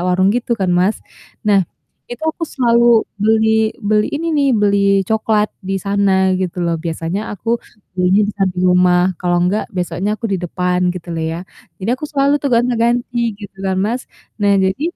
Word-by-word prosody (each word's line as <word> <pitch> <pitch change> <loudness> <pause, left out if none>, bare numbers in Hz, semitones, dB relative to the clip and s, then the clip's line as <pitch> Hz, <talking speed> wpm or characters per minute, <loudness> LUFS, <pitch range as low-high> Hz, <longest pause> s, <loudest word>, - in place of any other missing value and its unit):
warung 185 +2 +2
gitu 240 0 -1
kan, 185 -2 +1
Mas. 185 +4 +2 0.5
Nah, 200 -2 +4 0.5
itu 240 - -8
aku 330 - -5
selalu 235 -4 +2 0.3
beli 220 +1 +2
beli 210 +1 +2
ini 325 +3 -3
nih, 285 -3 +2
beli 200 -1 +3 0.3
cokelat 215 -1 +1 0.2
di 195 - 0
sana 200 -1 +1 0.3
gitu 180 -1 -3
loh, 170 -1 0
biasanya 165 +4 -3
aku 205 - -9 0.5
belinya 185 +3 +3
di - - -3
samping 185 -2 0
rumah, 180 0 +4 0.2
kalau 175 -1 0
enggak 195 +4 0
besoknya 180 +3 -2
aku 220 +2 -4
di 190 - 0
depan, 180 +1 -1
gitu 175 -1 -9
loh 165 - -3
ya. 165 - -4 0.4
Jadi 210 - -1
aku - - -5
selalu 280 0 +2
tuh 285 - 0
gonti-ganti 240 0 +1 0.2
gitu 200 -2 -10
kan, 190 - 0
Mas, 245 +3 -2 0.4
nah 205 -1 +3
jadi 190 +6 +1
200 Hz, 175 wpm, -17 LUFS, 180-230 Hz, 0.5 s, Nah